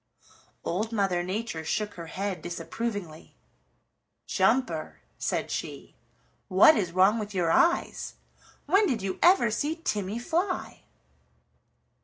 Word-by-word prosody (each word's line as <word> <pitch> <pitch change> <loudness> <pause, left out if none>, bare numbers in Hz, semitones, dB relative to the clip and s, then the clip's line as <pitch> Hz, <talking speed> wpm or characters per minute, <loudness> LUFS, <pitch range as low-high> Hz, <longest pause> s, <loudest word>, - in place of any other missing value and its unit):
Old 215 +6 -2
Mother 195 -5 +1
Nature 185 -2 -4
shook 210 +6 -2
her 170 -2 -8
head 195 +2 -4
disapprovingly. 190 -3 -5 0.9
"Jumper," 225 -10 0 0.2
said - - -2
she, - - -5 0.5
"what 195 +12 +7
is 185 -8 -1
wrong 190 +5 +4
with 210 -1 -6
your 170 -3 +1
eyes? 345 - +1 0.5
When 390 +7 +4
did 235 - -1
you 190 -1 -3
ever 350 - +5
see 295 +8 -1
Timmy 210 - -3
fly?" 350 +10 -2
210 Hz, 115 wpm, -27 LUFS, 185-240 Hz, 0.9 s, what